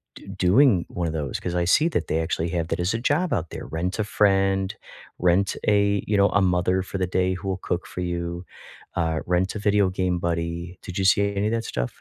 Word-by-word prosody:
d - - -13
doing 95 +1 +4
one 90 - -3
of - - -2
those," 75 -5 -3
'cause 90 - -4
I 85 -1 +1
see 150 - +4
that - - -2
they 80 - 0
actually 80 0 -1
have 85 -1 -2
that - - -2
as 90 +5 0
a - - 0
job 150 +8 +1
out 85 -2 -1
there, - - -7
rent-a-friend, 95 +2 +1 0.5
rent-a 100 +3 +2
you 105 - +1
know, 100 0 +5
a-mother-for-the-day-who-will-cook-for-you, 90 -1 -1 0.5
uh, 80 -2 0
rent-a-video-game-buddy. 90 -3 0
Did 90 - -7
you 95 - 0
see 100 +1 +3
any 100 +2 0
of 110 - -1
that 115 -1 -1
stuff? - - -2
95 Hz, 160 wpm, -24 LUFS, 85-100 Hz, 0.5 s, know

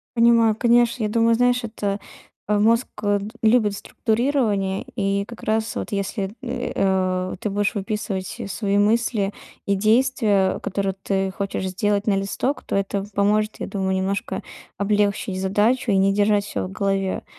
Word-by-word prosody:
Понимаю, 230 -2 +5
конечно, 235 0 +3
я 210 - 0
думаю, 230 +1 +3
знаешь, 245 0 +2
это, 205 -2 -3 0.5
а, 210 - +2
мозг 230 +4 +3 0.2
д 205 0 +2 0.2
любит 220 -2 +3
структурирование, 220 -4 0
и 200 -2 0
как 235 +1 -11
раз 220 +1 0
вот - - -4
если, 200 0 -2
э, 250 -1 -4
а, 185 -1 0
ты 210 - -4
будешь 205 +2 0
выписывать 200 0 -3
свои 200 +2 -1
мысли 210 -1 +1 0.3
и 200 - +1
действия, 215 -2 +2
которые 195 -1 -2
ты 195 -1 0
хочешь 195 -1 -3
сделать 205 +2 0
на 205 - +3
листок, 195 +8 -2
то - - -2
это 195 0 -1
поможет, 210 +2 +1
я - - -4
думаю, 190 -1 -1
немножко 195 +4 -2 0.4
облегчить 200 -1 0
задачу 210 +5 +1
и 195 - +3
не 195 +1 +3
держать 205 0 +2
всё 100 - -3
в 95 - -10
голове. 195 - -1
205 Hz, 155 wpm, -22 LUFS, 195-225 Hz, 0.5 s, Понимаю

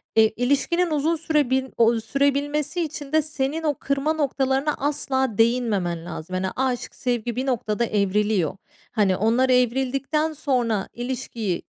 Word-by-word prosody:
Eee, 220 -1 +6
ilişkinin 285 +8 +1
uzun 305 +2 +1
süre 305 -4 +1
bin 265 0 0
ooo, 230 0 +4
sürebilmesi 285 +7 0
için 295 -3 -5
de 315 0 +4
senin 300 +1 -3
o 300 -2 +2
kırma 280 +4 0
noktalarına 275 -1 0
asla 265 -5 -1
değinmemen 215 -8 +1
lazım. 175 +1 -7
Hani, 185 +1 -1
aşk, 255 -2 -2
sevgi 240 -2 -2
bir 255 +2 -2
noktada 235 -3 0
evriliyor. 205 -4 +1 0.3
Hani, 200 -4 +2
onlar 235 +5 +2
evrildikten 265 +5 +1
sonra, 245 -9 0
ilişkiyi 240 -6 -3
260 Hz, 140 wpm, -24 LUFS, 225-285 Hz, 0.3 s, Eee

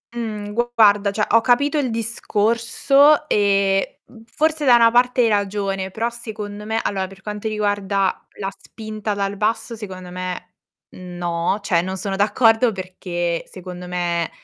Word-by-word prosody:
Mh. 215 -3 -4 0.2
Guarda 205 -2 +5
cioè, 210 +1 0
ho 230 - +6
capito 285 +6 +2
il 265 -3 0
discorso 230 +6 +2
e, 195 -3 +1
mhmm, 225 -2 -16
forse 310 +5 0
da 250 -2 +7
una 230 -1 +6
parte 245 +1 +3
hai 235 - +4
ragione, 195 -2 -1
però 225 +4 -1
secondo 215 -3 -7
me 220 +1 -1
allora, 190 -1 -1
per 195 0 -15
quanto 210 +1 -5
riguarda 205 -2 -1
la 195 -1 -2
spinta 215 -1 -6
dal 200 0 -2
basso, 225 +3 -1
secondo 185 -4 -8
me 180 0 -6 0.4
no, 175 +1 -3
cioè 175 -5 +2
non 190 +1 -4
sono 195 0 -3
d'accordo 225 +3 +3
perché 180 -3 -3
secondo 180 -1 -9
me, 175 -2 -1
205 Hz, 150 wpm, -21 LUFS, 190-230 Hz, 0.4 s, da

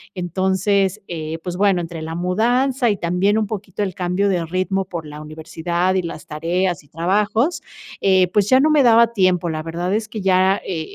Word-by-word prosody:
Entonces, 190 +2 0
eh, 160 -1 -5
pues, 180 0 -4
bueno, 195 -3 +3
entre 165 -1 -6
la 160 +1 -5
mudanza 240 - +1
y 205 - 0
también 185 +4 +1
un 215 - +1
poquito 205 -1 -5
el 190 -2 -3
cambio 185 +3 0
de 175 -3 0
ritmo, 185 +2 -1
por 170 -4 -6
la 150 0 -9
universidad, 165 +4 -2
y 190 - +1
las 165 -2 -7
tareas, 170 +2 -2
y - - -24
trabajos, 210 - 0 0.4
eh, 185 -2 +4
pues, 205 -1 +2
ya 260 0 +6
no 310 +2 +3
me 300 -2 +5
daba 235 -1 +5
tiempo. 185 -4 +2
La 155 -1 -3
verdad 170 +4 -3
es 215 +1 -1
que 215 -2 -6
ya 190 0 +3
eh, 165 -4 -3
185 Hz, 195 wpm, -20 LUFS, 170-205 Hz, 0.4 s, ya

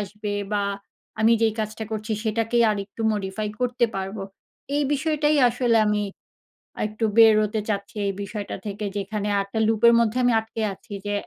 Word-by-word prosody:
আসবে? 210 +1 -4 0.2
বা 205 -1 +1 0.6
আমি 225 +1 +5
যেই 220 -1 +3
কাজটা 215 +1 -4
করছি 215 0 -3
সেটাকেই 225 +2 +1
আরেকটু 205 +1 -4
মডিফাই 210 +1 -3
করতে 250 0 +1
পারবো, 195 +2 -4 0.5
এই 295 - +2
বিষয়টাই 305 0 +1
আসলে 240 -1 +1
আমি 210 0 +1 0.8
আর - - -1
একটু 215 +2 -2
বের 225 -1 +8
হতে 215 +1 -2
চাচ্ছি 200 0 -3
এই 195 - -1
বিষয়টা 205 0 -5
থেকে। 205 0 -4
যেখানে 205 +1 -3
আরেকটা 200 +3 -3
লুপের 225 +1 +5
মধ্যে 230 +1 +1
আমি 245 -1 +4
আটকে 220 0 -6
আছি। 195 - -12
যে 205 - -1
215 Hz, 165 wpm, -24 LUFS, 205-230 Hz, 0.8 s, বের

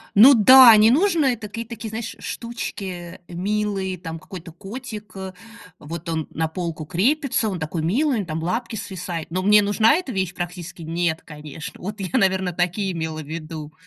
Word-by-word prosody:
Ну 250 +7 +9
да, 250 +1 +9
не 220 +2 +6
нужно 335 +1 +3
это 225 -4 -1
какие-то 230 +3 -7
такие 220 +1 -5 0.2
штучки 190 -7 -6
милые, 195 0 -2
там 165 -2 -7
какой-то 175 -2 -10
котик, 210 +2 -9
а, 190 -1 -6 0.5
вот 165 +3 -8
он 160 -2 -2
на 160 0 -1
полку 165 -2 -5
крепится, 235 - +1
он 185 -3 -4
такой 160 +1 -3
милый, 260 - +1
у - - 0
него 190 - -4
там 160 +1 -4
лапки 230 +6 -2
свисают, 180 -5 -5
но 185 +1 -1
мне 210 +2 +6
нужна 215 +5 +4
эта 350 -7 -3
вещь? 190 -3 -2
Практически 175 0 -6
нет, 165 0 -1
конечно. 150 0 -9
Вот 205 +3 -6
я, 185 -3 -4
наверно, 190 -1 +2
такие 180 +3 -1
имела 160 -2 -4
ввиду. 155 0 -7
190 Hz, 175 wpm, -22 LUFS, 165-220 Hz, 0.5 s, Ну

